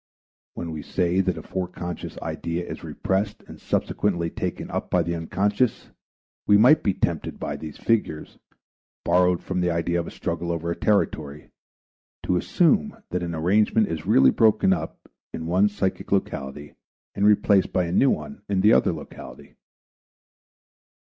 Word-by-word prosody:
When 85 - -5
we 80 -1 -5
say 90 +2 0
that 95 -1 -1
a - - -7
foreconscious 90 -2 -5
idea 85 +1 -3
is - - -8
repressed 100 +2 -2
and - - -13
subsequently 85 -5 -1
taken - - -4
up - - -3
by - - +2
the 85 - -2
unconscious, 100 +8 -1 0.6
we 105 - +6
might 125 +8 +6
be 100 -3 0
tempted 85 -3 -2
by - - -3
these 80 -2 -8
figures, 105 -9 -1 0.7
borrowed 90 0 +3
from 90 -1 -2
the 90 - +1
idea 85 +1 0
of 85 - -4
a - - -5
struggle 85 0 -3
over 85 0 -2
a - - -2
territory, 75 -9 -1 0.7
to 90 - 0
assume 195 - +2
that 90 - -1
an 85 -1 -3
arrangement 105 +6 +2
is 80 -2 -5
really 65 -1 +6
broken 110 -4 +4
up 90 - -6 0.3
in 80 - -5
one 90 +5 +3
psychic 95 -2 -3
locality 75 -6 -2 0.4
and 100 +1 +2
replaced 100 -2 +3
by 90 - +1
a 85 - -4
new 135 +9 +4
one 215 +9 -3
in 95 -2 +1
the 105 +3 +6
other - - +4
locality. - - -11
90 Hz, 160 wpm, -24 LUFS, 85-105 Hz, 0.7 s, we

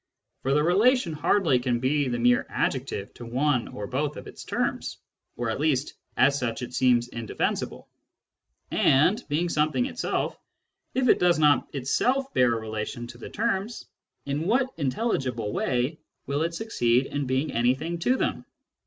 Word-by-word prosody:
For 135 +1 +1
the 150 - +3
relation 200 - +3
hardly 150 -2 +2
can 120 -1 0
be 140 +3 +1
the 120 -1 -1
mere 120 +1 +3
adjective 100 - -2
of 120 - -7
one 130 +1 +1
or 105 - -6
both 145 +6 -2
of - - -8
its - - -10
terms; - - -2 0.4
or, 120 -2 -1
at - - -3
least, 145 -2 +1 0.2
as 140 +2 +4
such 120 -1 -2
it 125 - -7
seems 120 -2 +3
indefensible. 115 -2 -3 0.8
And, 180 - +3
being 160 +4 +1
something 155 +8 +1
itself, 275 - -2 0.6
if 260 -1 +2
it - - +5
does 175 -2 +4
not 150 -4 +4
itself 255 - 0
bear 120 -2 +4
a - - -2
relation 110 +2 -5
to 120 - -11
the - - -8
terms, 220 0 -2 0.4
in 145 +4 -2
what 255 +4 +2
intelligible 130 - -1
way 130 +5 0 0.3
will 140 +2 -1
it 165 +1 -1
succeed 130 - +1
in 145 -1 -3
being 130 +4 0
anything 130 +9 0
to 250 +9 +2
them - - -1
140 Hz, 160 wpm, -26 LUFS, 125-170 Hz, 0.8 s, it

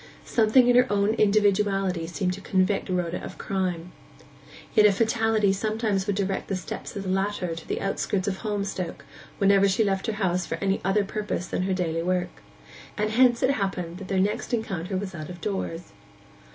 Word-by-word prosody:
Something 235 +2 +4
in 245 - +5
her 250 -1 +4
own 205 +1 +2
individuality 200 -4 +2
seemed 180 +2 -1
to 195 - -8
convict 195 +1 +1
Rhoda 180 -2 -2
of - - -8
crime. 180 -3 -2 0.8
Yet 210 -1 +7
a - - +4
fatality 220 -1 +2
sometimes 215 -1 -1
would 205 - 0
direct 195 -1 -2
the 195 - -1
steps 185 - -6
of 200 - -4
the 190 - -4
latter 190 -2 -1
to 165 - -10
the - - -2
outskirts 195 0 -1
of 190 -1 -1
Holmstoke 200 -5 -4 0.3
whenever 200 0 +4
she 195 +4 +2
left 195 +1 -1
her 220 - 0
house 185 -3 0
for - - -2
any 195 0 -1
other 195 +2 +2
purpose 205 -3 -3
than 180 - -2
her 190 +1 0
daily 165 -3 -1
work; 180 +1 -2 0.6
and 215 0 0
hence 240 +1 +4
it 260 - +4
happened 190 -7 -3
that 195 - -8
their 190 -1 0
next 210 +5 0
encounter 190 -4 -3
was 190 0 -4
out 155 -3 -7
of 175 -1 -8
doors. 180 - -4
195 Hz, 190 wpm, -26 LUFS, 185-210 Hz, 0.8 s, Yet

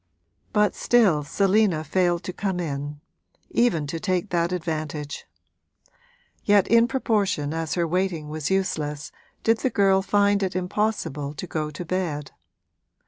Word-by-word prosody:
But 210 -2 +3
still 200 -11 +3
Selina 195 +1 +2
failed 175 +1 +1
to 185 0 -5
come 190 -2 -2
in 145 -2 -4 0.5
even 215 -11 +2
to 165 +3 -4
take 185 +2 -1
that 170 0 +1
advantage; 155 -4 -4 1.2
yet 205 -2 +4
in 230 +1 +5
proportion 205 - 0
as 165 -1 -2
her 170 -2 +1
waiting 175 -3 -1
was 155 -1 -3
useless 155 -6 -1 0.3
did 225 0 +3
the 260 - +1
girl 195 -3 +3
find 200 +1 +2
it 190 -2 -1
impossible 180 -7 -2
to 145 - -5
go 155 -3 -3
to 150 +4 -7
bed. 160 -5 -2
180 Hz, 140 wpm, -24 LUFS, 155-200 Hz, 1.2 s, in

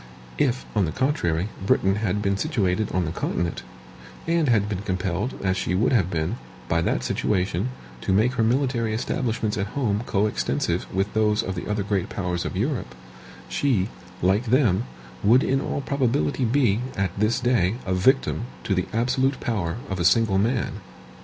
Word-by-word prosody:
If, 130 -2 +1
on 105 -3 +3
the 80 - -2
contrary, 95 - 0
Britain 95 0 +2
had 105 -1 -1
been 100 -1 +1
situated 105 - 0
on 90 -1 +1
the 75 - -3
continent, 85 0 -2 0.6
and 165 -3 +2
had 105 -4 +3
been 100 -3 -3
compelled, 95 +3 -2
as 95 -1 +1
she 90 - -1
would 110 +6 +2
have 95 -8 +3
been, 80 -3 -1 0.3
by 85 0 +1
that - - 0
situation, 95 +2 0 0.3
to - - -1
make 110 +6 +3
her 120 -3 +1
military 120 -2 +1
establishments 110 -2 -1
at 100 +7 -4
home 105 -6 +1
coextensive 105 0 0
with 95 +2 -1
those 105 -1 +2
of 95 - -3
the 90 - -5
other 105 -1 0
great 100 -2 -1
powers 90 -3 -2
of - - -3
Europe, 110 - -2 0.5
she, 115 -8 +1 0.3
like 100 +6 +3
them, 115 -4 +3 0.4
would 120 +6 +5
in 135 +1 +1
all 140 - -2
probability 125 - 0
be, 115 -4 +2 0.2
at 95 -2 0
this 110 +2 +2
day, 120 -6 +2
a 95 - 0
victim 95 - +2 0.2
to - - 0
the - - 0
absolute 130 +4 +1
power 95 -8 -1
of 95 -1 -3
a - - +1
single 95 +1 +4
man. 115 +4 0
105 Hz, 170 wpm, -24 LUFS, 95-120 Hz, 0.6 s, would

